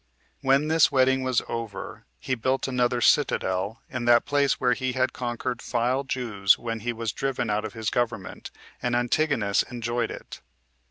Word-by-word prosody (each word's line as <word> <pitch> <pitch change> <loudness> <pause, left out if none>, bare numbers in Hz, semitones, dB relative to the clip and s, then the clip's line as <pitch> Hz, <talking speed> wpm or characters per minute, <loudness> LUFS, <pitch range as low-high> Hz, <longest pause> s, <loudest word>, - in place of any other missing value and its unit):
4. - - -10
When 140 +3 +4
this 160 -1 +4
wedding 130 -1 +3
was 130 -2 +1
over, 115 -4 -6
he 130 - -3
built 130 +3 0
another 125 -1 +1
citadel 100 +3 +1
in 130 -6 -4
that 120 0 +5
place 145 -1 +2
where 125 - +3
he 130 +1 -2
had 130 0 0
conquered 120 0 -3
the 125 +3 0
Jews 110 -7 +2
when 115 -1 -4
he 120 +3 -2
was 115 -2 -3
driven 130 -4 -2
out 105 +1 0
of 110 - -6
his 110 -2 -3
government, 120 -1 -3 0.3
and 120 -1 0
Antigonus 120 -4 +1
enjoyed 120 0 -3
it. - - -9
120 Hz, 170 wpm, -26 LUFS, 115-130 Hz, 0.3 s, that